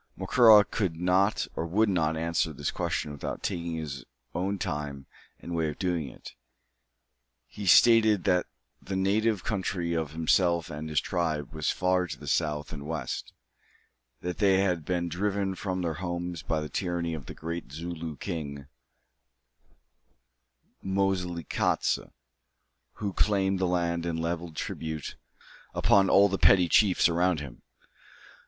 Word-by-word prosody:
Macora 105 Hz, +1 st, +6 dB
could 95 Hz, -7 st, -2 dB
not 90 Hz, +4 st, +2 dB
or -, -, -2 dB
would 105 Hz, +6 st, +2 dB
not 80 Hz, -5 st, +1 dB
answer 85 Hz, 0 st, 0 dB
this 70 Hz, -, -3 dB
question 75 Hz, -, -2 dB
without 70 Hz, -, -6 dB
taking 85 Hz, -1 st, -2 dB
his 75 Hz, -5 st, -5 dB, 0.3 s
own 95 Hz, +3 st, -1 dB
time 75 Hz, -7 st, -4 dB, 0.3 s
and 85 Hz, -, -7 dB
way 80 Hz, -2 st, 0 dB
of 75 Hz, -, -7 dB
doing 85 Hz, -6 st, -1 dB
it. -, -, -12 dB, 1.1 s
He 100 Hz, -2 st, -8 dB
stated 110 Hz, -1 st, +6 dB
that 90 Hz, -1 st, +2 dB, 0.3 s
the 95 Hz, -, -5 dB
native 100 Hz, +1 st, +1 dB
country 95 Hz, -5 st, -2 dB
of 80 Hz, -3 st, -2 dB
himself 85 Hz, +1 st, +2 dB
and 75 Hz, +1 st, -6 dB
his 75 Hz, -, +2 dB
tribe 80 Hz, -4 st, -2 dB
was 80 Hz, -2 st, -1 dB
far 90 Hz, 0 st, +1 dB
to 75 Hz, -3 st, -7 dB
the 75 Hz, -2 st, 0 dB
north 75 Hz, -2 st, -4 dB
and 70 Hz, 0 st, -7 dB
west; 80 Hz, -1 st, -4 dB, 0.9 s
that 90 Hz, 0 st, -4 dB
they 95 Hz, -2 st, +4 dB
had 90 Hz, -5 st, 0 dB
been 85 Hz, -1 st, -1 dB
driven 95 Hz, +3 st, -1 dB
from 95 Hz, -1 st, -3 dB
their 85 Hz, -2 st, -1 dB
home 85 Hz, +1 st, -4 dB
by 80 Hz, -1 st, 0 dB
the 75 Hz, -, -4 dB
tyranny 85 Hz, 0 st, -2 dB
of 75 Hz, -5 st, -7 dB
the -, -, -8 dB
great 85 Hz, 0 st, -5 dB
Zooloo 80 Hz, 0 st, -5 dB
King, 70 Hz, -6 st, -5 dB, 2.2 s
Moselekatse, 95 Hz, -4 st, 0 dB, 0.9 s
who 100 Hz, -2 st, -4 dB
claimed 95 Hz, -2 st, +1 dB
the 95 Hz, -, +1 dB
land 85 Hz, -1 st, 0 dB
and 80 Hz, -1 st, -2 dB
levied 85 Hz, 0 st, -3 dB
tribute 80 Hz, -2 st, -4 dB, 0.6 s
upon 95 Hz, -1 st, +4 dB
all 100 Hz, +1 st, +6 dB
the 95 Hz, 0 st, -2 dB
petty 90 Hz, -3 st, +6 dB
chiefs 95 Hz, +1 st, +4 dB
around 90 Hz, 0 st, +1 dB
him. 70 Hz, -4 st, -9 dB
85 Hz, 145 wpm, -28 LUFS, 80-95 Hz, 2.2 s, Macora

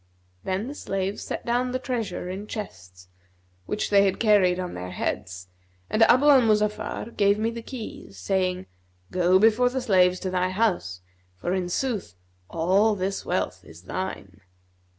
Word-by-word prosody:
Then 190 Hz, -, -2 dB
the 280 Hz, -, -5 dB
slaves 195 Hz, -7 st, -3 dB
set -, -, -5 dB
down 245 Hz, +1 st, 0 dB
the -, -, +1 dB
treasure 230 Hz, -9 st, -3 dB
in 195 Hz, +3 st, -6 dB
chests, 90 Hz, -, -8 dB, 0.6 s
which 210 Hz, -, -2 dB
they 200 Hz, -1 st, +6 dB
had 190 Hz, -, 0 dB
carried 195 Hz, -5 st, +4 dB
on 180 Hz, -1 st, -4 dB
their 90 Hz, 0 st, -6 dB
heads, 90 Hz, 0 st, -4 dB, 0.4 s
and 220 Hz, -, +1 dB
Abu 255 Hz, +5 st, +6 dB
al 285 Hz, -3 st, +7 dB
Muzaffar 210 Hz, +1 st, 0 dB
gave 200 Hz, 0 st, +3 dB
me 225 Hz, +2 st, 0 dB
the 230 Hz, 0 st, -6 dB
keys 225 Hz, -, -9 dB
saying, 185 Hz, -, -1 dB, 0.5 s
'Go 180 Hz, +1 st, +4 dB
before 225 Hz, +4 st, +4 dB
the 260 Hz, +1 st, -2 dB
slaves 185 Hz, -5 st, +3 dB
to 185 Hz, -, -3 dB
thy 185 Hz, 0 st, +1 dB
house; 185 Hz, -, -1 dB, 0.4 s
for 175 Hz, -, -2 dB
in 185 Hz, -2 st, -1 dB
sooth 210 Hz, -, -2 dB, 0.3 s
all 195 Hz, +6 st, +2 dB
this 195 Hz, 0 st, -3 dB
wealth -, -, -2 dB
is 80 Hz, +2 st, -14 dB
thine.' 100 Hz, -, -6 dB
195 Hz, 160 wpm, -25 LUFS, 180-220 Hz, 0.6 s, al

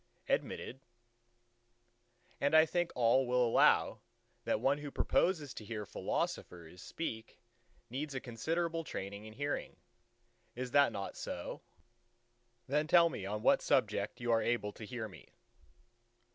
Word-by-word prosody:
"Admitted." 130 Hz, -, -2 dB, 1.6 s
"And 140 Hz, +3 st, +2 dB
I 160 Hz, 0 st, +8 dB
think 175 Hz, +1 st, -1 dB
all 125 Hz, +2 st, +3 dB
will 125 Hz, 0 st, +3 dB
allow 115 Hz, -, +4 dB, 0.5 s
that -, -, +1 dB
one 135 Hz, +5 st, +2 dB
who 145 Hz, 0 st, -6 dB
proposes 150 Hz, -1 st, +1 dB
to -, -, -8 dB
hear 105 Hz, -1 st, -5 dB
philosophers 85 Hz, -2 st, -4 dB
speak 110 Hz, -9 st, -5 dB, 0.5 s
needs 140 Hz, +3 st, -4 dB
a -, -, -1 dB
considerable 165 Hz, +8 st, -2 dB
training 100 Hz, -6 st, -6 dB
in 110 Hz, -, -10 dB
hearing. 145 Hz, +4 st, -3 dB, 0.8 s
Is 125 Hz, 0 st, -4 dB
that 140 Hz, -3 st, +5 dB
not 100 Hz, -2 st, -5 dB
so? -, -, -5 dB, 1.0 s
The 150 Hz, +3 st, +1 dB
tell 170 Hz, +1 st, +6 dB
me 95 Hz, -10 st, -5 dB
on 105 Hz, +2 st, -3 dB
what -, -, +5 dB
subject -, -, +1 dB
your 120 Hz, -2 st, +2 dB
are -, -, -1 dB
able 115 Hz, -3 st, 0 dB
to 110 Hz, -, -9 dB
hear 115 Hz, -1 st, -5 dB
me." 95 Hz, -, -14 dB
125 Hz, 135 wpm, -34 LUFS, 110-150 Hz, 1.6 s, I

